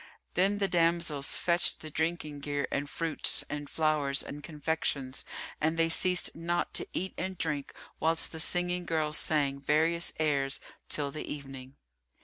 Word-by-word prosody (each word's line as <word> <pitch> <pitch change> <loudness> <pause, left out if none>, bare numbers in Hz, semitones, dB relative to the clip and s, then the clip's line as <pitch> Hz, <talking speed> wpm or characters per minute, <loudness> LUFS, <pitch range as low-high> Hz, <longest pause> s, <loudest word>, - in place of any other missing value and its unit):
Then 195 +3 +3
the 200 -1 +2
damsels 170 -5 +2
fetched 175 0 +2
the 155 - -7
drinking 160 -2 -1
gear 145 0 -1
and 145 0 -1
fruits 165 0 0
and 145 -1 -4
flowers 150 -3 +1
and 145 - -7
confections, 150 -4 -2 0.4
and 160 +2 +2
they 165 0 +4
ceased 180 +2 +2
not 170 +1 -1
to - - 0
eat 190 +1 -2
and 190 0 -3
drink,[FN#341] 150 -4 -2 0.2
whilst 165 +1 +2
the 160 - -6
singing 175 +2 +1
girls 155 -1 +1
sang 140 -3 +1
various 160 +4 +3
airs 140 -3 +1 0.3
till 145 -2 -1
the 155 - -5
evening. 135 -2 -7
155 Hz, 150 wpm, -31 LUFS, 145-170 Hz, 0.4 s, they